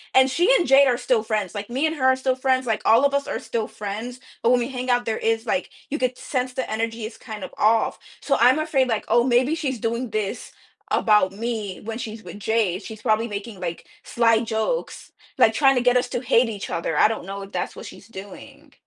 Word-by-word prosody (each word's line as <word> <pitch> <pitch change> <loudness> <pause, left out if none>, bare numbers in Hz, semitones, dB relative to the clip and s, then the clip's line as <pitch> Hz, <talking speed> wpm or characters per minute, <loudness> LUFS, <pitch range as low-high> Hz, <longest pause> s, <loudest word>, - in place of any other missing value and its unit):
and, 260 0 +6
she 355 - +3
and 350 - 0
Jade 275 +1 +6
are 245 -2 +2
still 240 -3 +1
friends, 215 -4 -2
like, 205 +1 -6
me 265 +6 0
and 315 - 0
her 260 - -1
are 260 0 +5
still 260 0 0
friends, 260 0 +1
like, 220 -3 -1
all 230 +5 +5
of 280 - +2
us 280 0 0
are - - -3
still 225 -2 -3
friends, 220 +5 -6 0.2
but 230 - +2
when 250 - +4
we 240 +1 -2
hang 255 -1 -5
out, 245 0 +2
there 225 -1 -1
is, 225 0 0
like 270 +4 -1 0.2
you 300 - -3
could 255 0 -1
sense 255 -2 -3
the 260 - -3
energy 225 0 -2
is 220 - -8
kind 215 -4 -8
of - - -8
off, 220 +1 +2 0.2
so 275 - +1
I'm 250 +5 +5
afraid, 300 -4 +1
like, 225 -3 -1
"Oh, 235 +2 +4
maybe 255 +4 +3
she's 265 -7 -3
doing 235 +2 -2
this 210 -2 -3 0.4
about 210 -3 +3
me 215 -2 -4
when 225 +1 -5
she's 225 -2 -7
with 180 +3 -10
Jade," 210 -3 0
she's 215 +1 -9
probably 225 0 +1
making, 205 -1 -7
like, 170 -2 -5 0.2
sly 230 -2 +3
jokes, 225 - -3 0.3
like, - - +5
trying 270 -2 +4
to 250 - +2
get 250 0 +4
us 250 0 0
to - - -2
hate 240 -1 +3
each 205 -3 -6
other, 165 -2 -2
I - - +6
don't 220 -4 -4
know 195 +1 -6
if 195 0 -10
that's 180 - -3
what - - -9
she's 200 - -13
doing. 200 -3 -12
230 Hz, 240 wpm, -23 LUFS, 215-255 Hz, 0.4 s, and